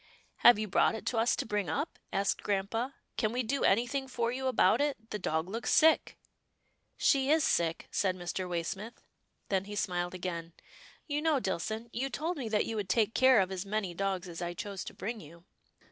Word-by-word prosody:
" - - -35
Have 240 - +7
you 215 0 -2
brought 195 +3 +3
it 220 - -7
to 230 - 0
us 230 +2 +3
to - - -3
bring 205 -6 -1
up? 160 - -3
asked 195 0 0
grampa, 215 +6 -1
" - - -48
can 215 -3 +1
we 250 +2 -1
do 270 +5 -1
anything 245 +6 +2
for 235 -2 -1
you 260 +1 -2
about 240 -2 +4
it? 270 -6 -2
The 210 - -3
dog 160 -2 -1
looks 225 +5 -3
sick." 320 0 +4 0.4
" - - -44 0.3
She 270 -1 +3
is 315 0 +4
sick," 165 -7 +1
said 185 -2 +1
Mr. 180 +1 -4
Waysmith, 190 +6 -4 0.5
then 195 -1 +1
he 205 +1 -7
smiled 175 -3 -1
again. 170 -2 -5 0.3
" - - -20
You 295 -1 -1
know, 310 -3 +2
Dillson, 220 +3 -3
you 265 +3 -2
told 325 +6 -3
me 245 -5 -4
that 215 -1 +1
you 225 - -4
would 200 -3 -3
take 220 +2 +2
care 260 -2 +6
of 190 -1 +1
as 190 -1 -3
many 200 -3 -2
dogs 190 0 -2
as 170 0 -7
I 175 0 -3
chose 200 0 -5
to - - -8
bring 225 +2 -4
to - - -11
you." 170 +3 -15
210 Hz, 220 wpm, -31 LUFS, 185-245 Hz, 0.5 s, Have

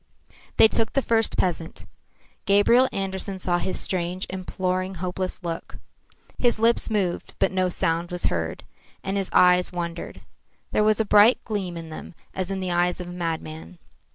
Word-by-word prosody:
They - - +9
took 225 0 -1
the 275 - +1
first 225 -1 +1
peasant. 170 -3 -2 0.6
Gabriel 235 +6 +5
Andersen 195 0 -3
saw 175 -1 0
his 185 - -1
strange, 180 0 -2
imploring, 185 0 -2
hopeless 185 +1 -3
look. 165 -1 -5 0.6
His 240 -2 +2
lips 230 +2 +3
moved, 195 -5 -2
but - - +2
no 185 -1 +1
sound 170 0 0
was 180 0 -3
heard, - - -2 0.4
and 195 0 -2
his 195 -2 -1
eyes 180 0 +5
wandered. 170 -1 -5 0.5
There 210 - +2
was 215 0 +3
a 220 - +2
bright 210 +4 +6
gleam 195 -6 -3
in 165 -1 -8
them 160 - -9 0.2
as 185 -1 -3
in 195 -1 -3
the 185 -1 -2
eyes 175 +1 +1
of 180 -1 -6
a - - -7
madman. 160 - -5
185 Hz, 165 wpm, -24 LUFS, 175-200 Hz, 0.6 s, They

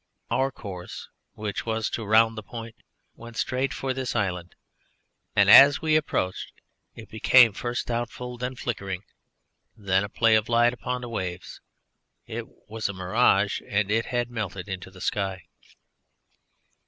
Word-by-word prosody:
Our 135 +1 +1
course, 95 -7 -8 0.2
which 105 -1 -4
was 110 -1 -1
to 115 - -3
round 110 +2 +4
the 110 - -5
point, 115 +1 -8 0.4
went 115 0 -12
straight 130 +1 -1
for 130 0 -3
this 130 -1 -4
island, 90 -3 -2 0.8
and, 100 - +5
as 140 +7 +9
we 155 -1 +1
approached, 95 -11 -1 0.4
it 110 - -11
became 115 +1 +5
first 120 +3 -3
doubtful, 120 +1 -4
then 125 +1 -3
flickering, 100 -6 -4 0.7
then 95 -2 +1
a 100 - -5
play 115 +2 +3
of 110 +1 +2
light 120 +1 +4
upon 125 0 -4
the 120 - -7
waves. 90 -5 -5 0.6
It - - -6 0.2
was 110 -1 -3
a - - -4
mirage, 100 +1 +2
and 105 0 0
it 115 +1 +1
had 120 -1 -2
melted 100 -5 -5
into 95 -1 -6
the 95 0 -6
air. 95 -3 -3
110 Hz, 150 wpm, -26 LUFS, 100-120 Hz, 0.8 s, as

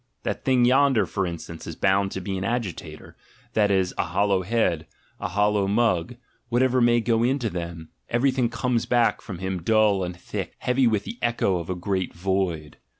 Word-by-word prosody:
That - - -3
thing 130 -2 +3
yonder, 135 -1 +4
for 95 -2 -2
instance, 85 -1 -7
is 80 - -6
bound 95 +2 +2
to 95 - -4
be 95 +1 -3
an 95 - -3
agitator, 95 -8 -4 0.4
that 105 -2 +3
is, 95 -2 +1
a - - +2
hollow 95 +2 +1
head, 90 -6 0 0.3
a - - -2
hollow 105 +1 +1
mug: 105 -2 +1 0.3
whatever 130 +1 +2
may 120 0 +4
go 115 0 +1
into 125 -1 +1
him, 85 -2 -6 0.2
everything 125 0 +2
comes 120 0 -1
back 120 -1 +2
from 100 -6 -7
him 95 0 -3
dull 105 0 +3
and 90 -1 -5
thick, - - -5
heavy 125 0 +2
with 105 -3 +1
the 120 - -8
echo 115 -6 +1
of 85 - -6
the 90 - -2
great 95 0 -2
void. 90 -4 -2
100 Hz, 185 wpm, -24 LUFS, 90-120 Hz, 0.4 s, yonder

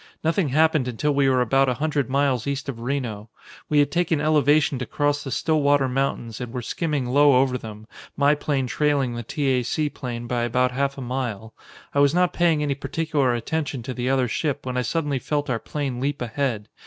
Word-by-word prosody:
Nothing 165 0 +1
happened 155 -1 +3
until 135 +5 0
we 140 -1 +3
were 130 -1 +3
about 135 +3 +3
a 125 - 0
hundred 145 0 -1
miles 135 -3 +1
east 140 0 -3
of 130 -4 -5
Reno. 115 -4 -3 0.4
We 150 - +2
had 145 -1 +4
taken 170 -1 +1
elevation 150 -2 +3
to 125 - -4
cross 145 0 0
the 135 - -5
Stillwater 145 -1 +2
Mountains 125 -4 -2
and 125 -2 -5
were 125 -1 -4
skimming 150 -1 -2
low 140 +2 +5
over 130 -1 +2
them, 110 -3 -8 0.3
my 145 +1 +4
plane 145 -2 -1
trailing 140 -1 0
the 120 - -4
T. 135 +2 0
A. - - -1
C. 150 +4 -1
plane 120 -2 -6
by 120 0 -1
about 125 +2 +1
half 140 +2 -1
a - - -6
mile. 120 -4 -4 0.4
I 140 - +1
was 145 +2 +4
not 180 0 +2
paying 165 -4 +2
any 145 -1 0
particular 140 -2 -1
attention 140 +1 -3
to 130 - -5
the 125 +1 -2
other 130 -2 +2
ship 145 +3 -2
when 125 -1 -3
I 125 - +1
suddenly 145 0 -1
felt 145 +1 -2
our 115 - 0
plane 135 -3 -4
leap 140 +2 -2
ahead. 120 -3 -2
135 Hz, 210 wpm, -23 LUFS, 125-145 Hz, 0.4 s, low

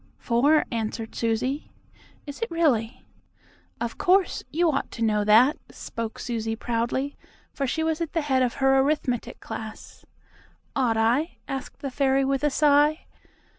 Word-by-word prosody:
"Four," 280 +6 +3
answered 225 0 -3
Susie. 250 +5 -1 0.6
"Is 285 +4 -8
it 460 - -1
really?" 260 -8 0 0.7
"Of 235 -1 -4
course. 375 +1 +3
You 330 +2 +2
ought 275 - -2
to 230 - -3
know 210 -2 +2
that," 225 +7 +5
spoke 230 -1 -6
Susie 225 -2 -3
proudly, 240 +5 -2 0.4
for 275 - -2
she 320 +5 -1
was 320 0 -1
at 330 - -3
the 330 - +1
head 265 -3 +1
of 250 -2 +1
her 270 0 +3
arithmetic 270 -4 -1
class. 220 -1 -8 0.7
"Ought 245 -5 +1
I?" 245 +9 +1
asked 270 0 -6
the 275 - -3
fairy 270 0 +2
with 275 +1 0
a 295 - +4
sigh. 295 +2 +3
265 Hz, 150 wpm, -25 LUFS, 230-295 Hz, 0.7 s, that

